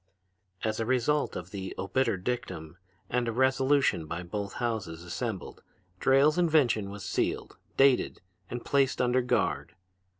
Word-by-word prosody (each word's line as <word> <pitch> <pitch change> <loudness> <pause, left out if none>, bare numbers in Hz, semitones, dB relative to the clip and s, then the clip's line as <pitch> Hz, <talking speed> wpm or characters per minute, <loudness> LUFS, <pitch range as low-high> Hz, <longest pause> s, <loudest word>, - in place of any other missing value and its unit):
"As 110 0 -1
a 115 - 0
result 130 +4 +1
of 90 +1 -6
the 95 -2 -5
obiter 115 +2 0
dictum 90 -6 -4 0.3
and 125 -1 0
a - - +1
resolution 130 - +2
by 85 +3 -4
both 100 +3 -4
Houses 100 -9 -3
Assembled 95 +2 -5 0.4
Drayle's 140 +5 +4
invention 145 - +3
was 100 -2 -7
sealed, - - -2 0.2
dated 135 -2 +4 0.3
and 120 0 -5
placed 135 -2 +2
under 125 0 +3
guard. 125 - 0
120 Hz, 135 wpm, -29 LUFS, 95-130 Hz, 0.4 s, Drayle's